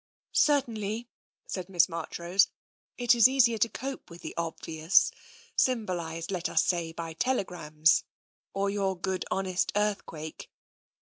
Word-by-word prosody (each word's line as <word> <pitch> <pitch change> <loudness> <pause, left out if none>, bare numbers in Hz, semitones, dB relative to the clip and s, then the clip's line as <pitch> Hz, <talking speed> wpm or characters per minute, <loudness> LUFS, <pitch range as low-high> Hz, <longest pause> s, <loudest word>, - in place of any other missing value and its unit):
" - - -67 0.2
Certainly," 230 -4 -1 0.4
said 185 -1 -5
Miss 175 -3 +4
Marchrose, 170 +3 +1 0.3
" - - -61
it 245 -1 +4
is 235 0 +7
easier 240 -4 +3
to 230 - +3
cope 270 +5 -6
with 170 0 -12
the - - -5
obvious, 165 0 +2 0.4
symbolised, 175 -9 -1
let 180 -3 -2
us - - +3
say, 170 -2 0
by 165 0 -6
tele 250 +6 +1
grams, 155 -3 +2 0.5
or 195 0 -1
your 195 -2 -1
good 185 +1 -2
honest 190 -1 0
earthquake." 195 -7 -3
190 Hz, 140 wpm, -29 LUFS, 165-220 Hz, 0.5 s, is